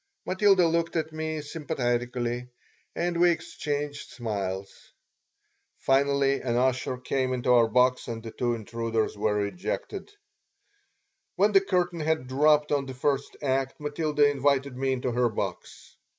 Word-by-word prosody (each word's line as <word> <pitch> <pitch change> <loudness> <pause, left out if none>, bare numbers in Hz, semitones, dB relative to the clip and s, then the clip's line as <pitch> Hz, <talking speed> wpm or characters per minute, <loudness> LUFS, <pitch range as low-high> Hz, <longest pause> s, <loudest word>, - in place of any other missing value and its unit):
Matilda 190 -1 +4
looked 165 +1 0
at 160 -1 -1
me 155 0 -3
sympathetically 125 -5 -2 0.5
and 175 0 -1
we 175 - +7
exchanged 145 -3 -3
smiles. 100 -4 -4 1.1
Finally 140 0 +2
an 120 -2 -1
usher 130 0 +1
came 130 0 -1
into 125 0 0
our 120 -2 +5
box 125 +3 +2
and 115 -2 -5
the 115 - -7
two 120 0 -1
intruders 115 0 -2
were 105 0 0
ejected 180 - -5 1.3
When 205 +2 +3
the 195 -1 +6
curtain 180 -3 0
had 160 -3 0
dropped 150 +3 +3
on 140 -2 +1
the 130 - -7
first 140 +1 -1
act 135 0 -1
Matilda 150 0 +1
invited 140 -1 +1
me 135 +1 0
into 125 -1 -2
her 120 0 +2
box. 110 - -6
135 Hz, 135 wpm, -27 LUFS, 120-155 Hz, 1.3 s, we